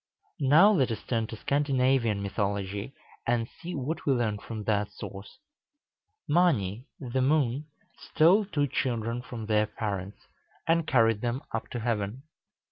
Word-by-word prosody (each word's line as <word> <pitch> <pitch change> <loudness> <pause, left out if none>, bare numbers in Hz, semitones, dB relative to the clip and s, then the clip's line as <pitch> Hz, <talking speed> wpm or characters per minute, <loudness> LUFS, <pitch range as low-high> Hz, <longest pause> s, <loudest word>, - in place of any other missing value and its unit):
Now 155 +9 +6
let 135 - +2
us 110 -3 -4
turn 115 -3 -1
to 115 - -7
Scandinavian 130 -5 +1
mythology, 100 +3 -2 0.3
and 115 -1 +1
see 170 +5 -8
what 150 +4 -3
we 140 - +3
learn 110 -4 0
from 110 0 -6
that 105 -1 0
source. 100 0 -9 0.9
Mâni, 130 - +2
the 130 0 -2
moon, 140 0 +1 0.3
stole 185 +7 +4
two 150 -7 0
children 120 -3 -1
from 120 -3 -7
their 105 0 +2
parents, 100 -2 -4 0.5
and 165 -1 +2
carried 115 -4 +3
them 120 +2 -2
up 115 - -3
to 120 - -5
heaven. 115 +2 -2
120 Hz, 140 wpm, -28 LUFS, 105-140 Hz, 0.9 s, Now